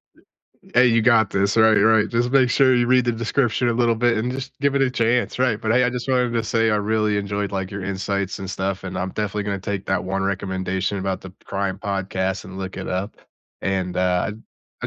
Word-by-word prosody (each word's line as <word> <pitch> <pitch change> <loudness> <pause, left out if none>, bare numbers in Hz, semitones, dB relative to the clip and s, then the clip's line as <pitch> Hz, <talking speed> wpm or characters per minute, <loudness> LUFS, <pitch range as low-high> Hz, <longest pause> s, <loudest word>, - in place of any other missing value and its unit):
Y - - -25 0.5
Hey, 125 +1 +6
you 115 -2 +3
got 110 -4 +4
this, 100 +1 0
right, 110 0 +6
right, 110 +1 +4
just 120 +1 0
make 130 -1 +4
sure 130 0 +4
you 120 -1 +2
read 125 0 +4
the 120 - +1
description 115 +1 0
a - - +2
little 120 -1 +2
bit 120 +1 +2
and 120 +3 -1
just 135 0 -7
give 140 -1 +1
it 140 - +2
a 130 - +2
chance, 120 0 0
right? 120 -4 +1
But 110 - -2
hey, 125 +1 +4
I 125 - +1
just 125 0 -5
wanted 125 -2 +1
to 115 -1 0
say 115 +1 +1
I 105 - +2
really 105 0 0
enjoyed, 100 0 -3
like, 95 -1 -3
your 100 -1 -6
insights 100 0 -2
and 95 - -6
stuff, 95 0 -3
and 95 -1 -5
I'm 95 +1 -2
definitely 105 0 -3
gonna 100 -1 -2
take 100 -1 -4
that 95 -1 0
1 95 +1 -2
recommendation 95 0 -2
about 95 0 -2
the 95 - -10
crime 100 -1 -3
podcast 95 -1 -2
and 95 0 -10
look 95 0 -6
it 95 - -5
up. 95 +3 -3 0.4
And, 95 -2 -2
uh, 90 0 +1
I 110 +2 -12
105 Hz, 235 wpm, -22 LUFS, 95-120 Hz, 0.5 s, Hey